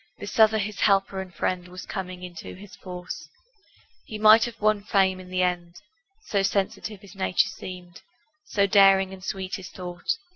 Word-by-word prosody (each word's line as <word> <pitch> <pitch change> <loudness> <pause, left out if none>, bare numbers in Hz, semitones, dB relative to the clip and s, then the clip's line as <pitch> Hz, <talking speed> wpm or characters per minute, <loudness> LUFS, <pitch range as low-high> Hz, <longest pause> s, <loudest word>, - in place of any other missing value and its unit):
This - - -6
other 220 0 +6
his 210 -1 -3
helper 195 -1 +2
and 190 -1 -9
friend 180 0 -2
Was 180 +1 -9
coming 185 -1 -6
into 175 -2 -8
his 195 +1 -13
force; 180 +10 -8 0.7
He 215 - -7
might 215 +1 +7
have 240 -1 -8
won 215 -1 +2
fame 190 -2 +2
in 185 0 -11
the 185 0 0
end, 175 -1 -2 0.5
So 200 - 0
sensitive 200 +1 -2
his 200 -3 -14
nature 190 -1 +1
seemed, 180 -1 -9 0.4
So 200 -9 +1
daring 195 -1 +5
and 190 -1 -11
sweet 190 0 -4
his 190 -1 -9
thought. 180 - -4
190 Hz, 175 wpm, -25 LUFS, 180-205 Hz, 0.7 s, might